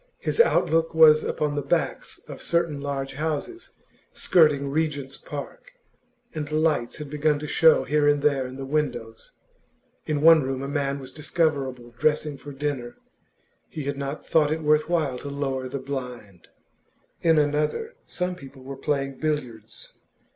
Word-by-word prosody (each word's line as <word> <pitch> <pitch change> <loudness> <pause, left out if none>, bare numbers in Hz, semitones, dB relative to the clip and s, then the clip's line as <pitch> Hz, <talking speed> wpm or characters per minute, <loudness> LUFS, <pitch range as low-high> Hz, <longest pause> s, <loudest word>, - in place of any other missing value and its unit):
His - - -3
outlook 165 - +3
was 155 -1 +7
upon 150 -1 -1
the 145 - -1
backs 140 - -2
of - - -9
certain 170 -4 0
large 135 -1 -3
houses 160 - -4 0.4
skirting 150 -5 +3
Regent's 145 -3 -2
Park, 150 - -8 0.6
and 155 -2 -5
lights 155 -6 +1
had 150 - -7
begun 150 +1 +1
to 150 - -6
show 160 +1 +5
here 150 0 +2
and 145 -1 +3
there 140 -3 +2
in 130 - -9
the 135 0 -6
windows: 125 -6 -3 0.7
in 150 -2 0
one 165 -1 +8
room 135 0 -3
a - - -3
man 140 -1 -1
was 130 -2 -9
discoverable 140 -6 -1
dressing 150 -1 +1
for 140 +2 -10
dinner, 135 -4 -4 0.7
he 155 - -6
had 140 +1 -2
not 140 +2 -5
thought 155 -2 +3
it 160 0 -2
worth 150 +1 +3
while 150 -7 0
to 140 - -7
lower 135 -2 -3
the 140 - -3
blind; 125 -8 -7 0.7
in 165 -1 +4
another, 150 - 0
some 180 0 -2
people 135 -5 -12
were 135 +1 -7
playing 135 -1 -2
billiards. 120 -8 -4
145 Hz, 155 wpm, -25 LUFS, 135-155 Hz, 0.7 s, one